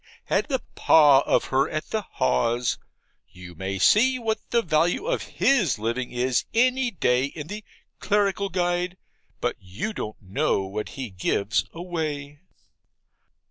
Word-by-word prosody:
had - - 0
the 265 -4 -2
PAS 145 -4 +6
of - - +3
her 135 +3 +3
at 155 - -4
the 220 - 0
Haws 125 - 0 0.5
you 90 -1 -12
may 95 +3 -4
see 255 - +4
what 225 -3 -1
the 235 -1 +2
value 170 - +1
of - - 0
his 215 - +1
living 115 +4 -2
is 125 0 0
any 255 +2 +3
day 125 - +1
in 145 +1 -7
the 210 +6 -7 0.4
'Clerical 200 -1 +1
Guide;' 175 0 -1 0.4
but - - -1
you 100 - -5
don't 110 - -6
know 95 0 0
what 100 +3 -5
he 130 -5 -5
gives 100 +4 0
away. 155 -5 -4
155 Hz, 140 wpm, -25 LUFS, -, 0.5 s, PAS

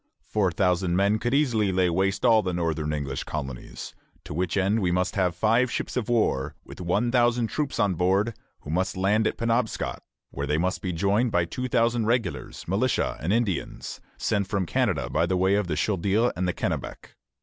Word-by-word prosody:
Four 100 -4 0
thousand 90 -2 +1
men 100 +3 +2
could 120 +2 -1
easily 115 -9 +2
lay 95 -1 +2
waste 95 +6 0
all 115 -2 +6
the 90 -3 -2
northern 80 -3 -1
English 70 -3 -3
colonies, 65 -5 -6 0.3
to - - -7
which 90 +3 -1
end 100 +3 +2
we 90 -2 +1
must 90 +2 0
have 90 -4 +1
five 115 +7 +3
ships - - -3
of 120 -3 -2
war, 110 - +1
with - - -10
one 100 +7 +1
thousand 120 -2 +2
troops 150 -3 -2
on 100 -2 +2
board, 95 +6 +1 0.3
who 75 - -7
must 95 +3 -1
land 105 +4 +2
at - - -2
Penobscot, 115 0 -1 0.3
where 70 +1 -4
they 75 +1 +1
must 90 +3 -1
be 90 - -2
joined 100 +7 +1
by 90 -3 +2
two 125 +9 -4
thousand 115 -2 +1
regulars, 120 0 -2
militia, - - 0
and 85 - -1
Indians, 110 -4 -2 0.2
sent 100 -3 0
from 95 -2 -1
Canada - - 0
by 85 - +1
way 95 +1 +2
of 100 -2 +1
the 75 - -1
Chaudière 100 +7 +1
and 90 0 -1
the 90 - 0
Kennebec. - - -4
95 Hz, 195 wpm, -26 LUFS, 90-115 Hz, 0.3 s, all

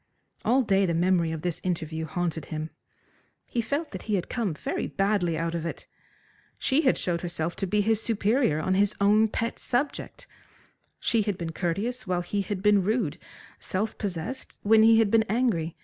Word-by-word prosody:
All 255 +4 +3
day 195 -3 +2
the 170 - 0
memory 175 -1 +2
of 160 -1 -5
this 175 -2 -2
interview 160 -3 -2
haunted 165 -1 -2
him. 155 0 -5 0.7
He 235 - -1
felt 285 +7 -2
that 190 - -6
he 215 - -1
had 180 - -2
come 215 -10 -1
very - - -3
badly 195 -5 0
out 165 +1 -2
of 170 -2 -2
it. 170 - -5 0.7
She 275 +3 +2
had 265 -5 +3
showed 170 -2 -1
herself 170 -1 -3
to 195 - -1
be 210 +3 +2
his 220 +1 +1
superior 220 - +1
on 185 +4 0
his 200 +2 +2
own 210 +2 +5
pet 230 +2 -3
subject. 275 +4 -2 0.7
She 230 - +2
had 205 -3 -1
been 165 -1 -4
courteous 195 +10 -2
while 180 -1 0
he 200 +3 -1
had 195 -1 -4
been 210 -1 +5
rude, 220 +6 0 0.4
self 205 +4 -2
possessed 200 +5 -4
when 220 +1 +6
he 225 0 +7
had 220 -3 +3
been 225 -1 +5
angry. 205 -8 0
195 Hz, 185 wpm, -27 LUFS, 170-225 Hz, 0.7 s, he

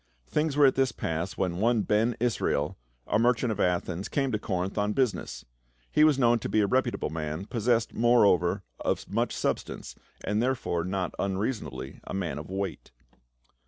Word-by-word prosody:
Things 150 -1 0
were 145 - +7
at 135 - +5
this 135 -2 +2
pass 90 -3 -3
when 90 -2 -1
one 115 +2 +2
Ben 110 +3 +2
Israel, 105 -11 0 0.3
a - - +1
merchant 120 0 +2
of 105 - -4
Athens, 90 +1 0
came 135 -2 0
to 110 - 0
Corinth 95 -1 -2
on 105 0 0
business. 130 -4 -1 0.5
He 150 - +4
was 155 -3 +5
known 120 -3 +4
to - - -4
be 110 - +3
a - - +3
reputable 125 - 0
man, 80 +3 -4
possessed 115 0 0
more 120 -1 +5
over 90 -3 +2 0.2
of - - -1
much - - 0
substance, - - -3 0.3
and 105 +2 0
therefore 120 -9 0
not 95 -1 -2
unreasona 100 +5 -1
bly 65 +1 -8
a - - -5
man 85 -6 -2
of 75 - -9
weight. 95 -1 -4
105 Hz, 180 wpm, -28 LUFS, 90-120 Hz, 0.5 s, were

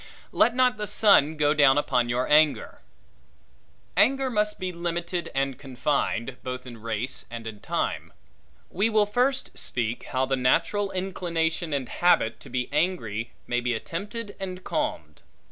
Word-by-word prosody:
Let 240 - +3
not 250 -3 +3
the 210 0 -3
sun 200 -8 +4
go 150 -1 +3
down 145 -2 +5
upon 125 -4 +1
your 125 +2 0
anger. 150 0 +3 1.2
Anger 270 0 +3
must 210 -1 0
be 185 -1 -3
limited 170 0 -3
and 135 -1 -1
confined, 130 -2 -2
both 125 0 -5
in 120 -3 -10
race 115 +3 -2
and 115 0 -7
in 110 -2 -7
time. - - -2 0.6
We 200 +5 +1
will 215 -2 +4
first 250 +6 0
speak 120 -1 -2
how 130 0 0
the 135 0 0
natural 195 +10 +1
inclination 170 -3 -2
and 140 -3 -1
habit 175 -9 +2
to - - -13
be 125 0 -2
angry, 145 - -1
may 120 - 0
be 120 -1 0
attempted 205 - -6
and 185 -1 -6
calmed. 305 -1 -3
155 Hz, 150 wpm, -26 LUFS, 125-200 Hz, 1.2 s, down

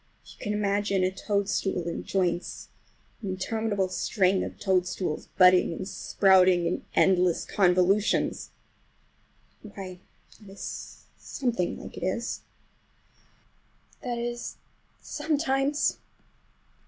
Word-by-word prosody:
If - - -13
you - - -16
can 210 - 0
imagine 200 -2 +1
a 185 - +2
toadstool 195 -2 -1
in 170 - -3
joints, 180 -2 -2 0.5
an 200 - -4
interminable 200 +1 -1
string 190 0 +1
of - - -7
toadstools, 180 -4 0
budding 180 -2 +6
and 185 +3 -5
sprouting 185 -3 +4
in 170 - -1
endless 180 -2 +3
convolutions,—why, 190 0 -2 0.4
that 205 - -14
is 195 - -8 0.2
something 235 -9 -2
like - - -10
it. 235 +5 -2 1.6
That 245 -4 -3
is, 240 0 -4 0.5
sometimes! 290 -2 0
195 Hz, 95 wpm, -27 LUFS, 185-215 Hz, 1.6 s, budding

